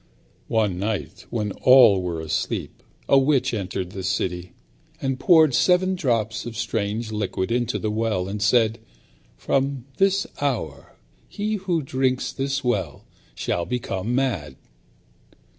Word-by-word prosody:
One 105 Hz, -5 st, 0 dB
night 100 Hz, 0 st, -4 dB
when 105 Hz, -3 st, -2 dB
all 125 Hz, -7 st, +7 dB
were 85 Hz, -3 st, -3 dB
asleep, 80 Hz, -1 st, -3 dB, 0.3 s
a 140 Hz, -, +6 dB
witch 135 Hz, -2 st, +2 dB
entered 95 Hz, -3 st, -3 dB
the 95 Hz, -, -6 dB
city, 90 Hz, -1 st, -2 dB, 0.5 s
and 135 Hz, -1 st, -2 dB
poured 160 Hz, -6 st, +5 dB
seven 185 Hz, +7 st, +3 dB
drops 115 Hz, -, -1 dB
of 115 Hz, -2 st, -7 dB
strange 110 Hz, 0 st, -2 dB
liquid 100 Hz, -2 st, -2 dB
into 120 Hz, 0 st, 0 dB
the 110 Hz, -, -2 dB
well, 110 Hz, -4 st, -1 dB
and 100 Hz, +1 st, -5 dB
said, 110 Hz, +1 st, +3 dB, 0.6 s
"From 135 Hz, -, -1 dB
this 195 Hz, 0 st, +2 dB, 0.2 s
hour 105 Hz, -, -3 dB, 0.3 s
he 210 Hz, +1 st, -2 dB
who 180 Hz, -5 st, -1 dB
drinks 130 Hz, -1 st, 0 dB
this 135 Hz, 0 st, -2 dB
water 95 Hz, -, -1 dB, 0.3 s
shall 85 Hz, -, -1 dB
become 120 Hz, -2 st, -2 dB
mad." 100 Hz, -, -1 dB
115 Hz, 130 wpm, -23 LUFS, 95-135 Hz, 0.6 s, all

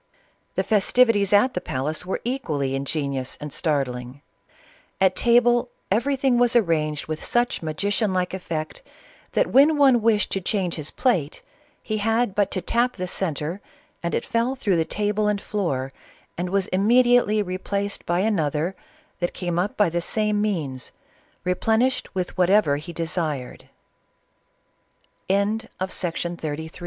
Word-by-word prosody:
The -, -, +1 dB
festivities 215 Hz, -1 st, +3 dB
at 210 Hz, +6 st, +4 dB
the 180 Hz, -, -2 dB
palace 155 Hz, +7 st, -3 dB
were 190 Hz, -, -2 dB
equally 155 Hz, -, -2 dB
inge 135 Hz, +2 st, -2 dB
nious 140 Hz, -4 st, -3 dB
and 150 Hz, -1 st, -7 dB
startling. 135 Hz, -4 st, -2 dB, 0.8 s
At 190 Hz, -1 st, +3 dB
table 240 Hz, +1 st, +3 dB, 0.2 s
everything 255 Hz, +3 st, +2 dB
was 245 Hz, 0 st, +3 dB
arranged 155 Hz, -8 st, +1 dB
with 155 Hz, 0 st, -5 dB
such 240 Hz, 0 st, 0 dB
magician 190 Hz, +6 st, -1 dB
like 185 Hz, -1 st, -1 dB
effect 170 Hz, -, -5 dB, 0.5 s
that -, -, +1 dB
when 295 Hz, +3 st, +6 dB
one 265 Hz, -5 st, +5 dB
wished 215 Hz, -2 st, +2 dB
to 195 Hz, -, -1 dB
change 185 Hz, -2 st, -1 dB
his 155 Hz, -2 st, -3 dB
plate, 180 Hz, -, 0 dB, 0.4 s
he 215 Hz, -, -2 dB
had 225 Hz, 0 st, +1 dB
but 205 Hz, 0 st, +1 dB
to 185 Hz, -, -1 dB
tap 245 Hz, +1 st, +1 dB
the 185 Hz, -, -3 dB
centre 170 Hz, 0 st, -3 dB, 0.4 s
and 170 Hz, -, -2 dB
it -, -, -2 dB
fell 235 Hz, +3 st, 0 dB
through 205 Hz, -9 st, +1 dB
the 160 Hz, -, +1 dB
tat^and 210 Hz, +1 st, 0 dB
floor, 140 Hz, -12 st, -2 dB, 0.4 s
and 175 Hz, +1 st, -3 dB
was 195 Hz, 0 st, +1 dB
immediately 230 Hz, +1 st, +4 dB
replaced 200 Hz, +2 st, -3 dB
by 175 Hz, +2 st, +1 dB
anotner 165 Hz, -4 st, 0 dB, 0.5 s
that 175 Hz, 0 st, -2 dB
came 175 Hz, -2 st, -2 dB
up 190 Hz, +4 st, -2 dB
by 205 Hz, -5 st, +3 dB
the 175 Hz, +1 st, -1 dB
'same 210 Hz, +2 st, 0 dB
means, 155 Hz, -12 st, -2 dB, 0.5 s
replenished 220 Hz, +7 st, 0 dB
with 180 Hz, -1 st, -3 dB
whatever 180 Hz, -5 st, +4 dB
he 160 Hz, +4 st, -7 dB
desire 160 Hz, -5 st, -3 dB
190 Hz, 135 wpm, -24 LUFS, 160-225 Hz, 0.8 s, when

